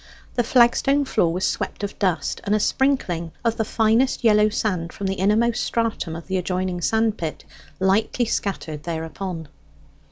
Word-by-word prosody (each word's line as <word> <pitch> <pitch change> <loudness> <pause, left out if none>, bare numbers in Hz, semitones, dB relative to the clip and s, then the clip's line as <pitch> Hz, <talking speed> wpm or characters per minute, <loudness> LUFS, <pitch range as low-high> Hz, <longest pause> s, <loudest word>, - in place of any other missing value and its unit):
The 240 - +1
flagstone 265 +4 +3
floor 195 -10 +1
was 180 +2 -1
swept - - -3
of 205 - -5
dust, 175 -7 0
and 205 +1 +1
a - - +2
sprinkling 200 - 0
of 230 -1 +1
the 220 - +1
finest 225 +4 +2
yellow 210 -1 +5
sand 185 -6 -2
from 200 - -6
the 190 - 0
innermost 220 +5 +2
stratum 230 -8 -1
of 165 - -8
the 190 0 -1
adjoining 180 0 -2
sand 220 +2 +1
pit 160 -2 -4 0.4
lightly 210 +5 +2
scattered 180 -9 -3
thereupon. 165 +1 -5
200 Hz, 160 wpm, -23 LUFS, 175-230 Hz, 0.4 s, yellow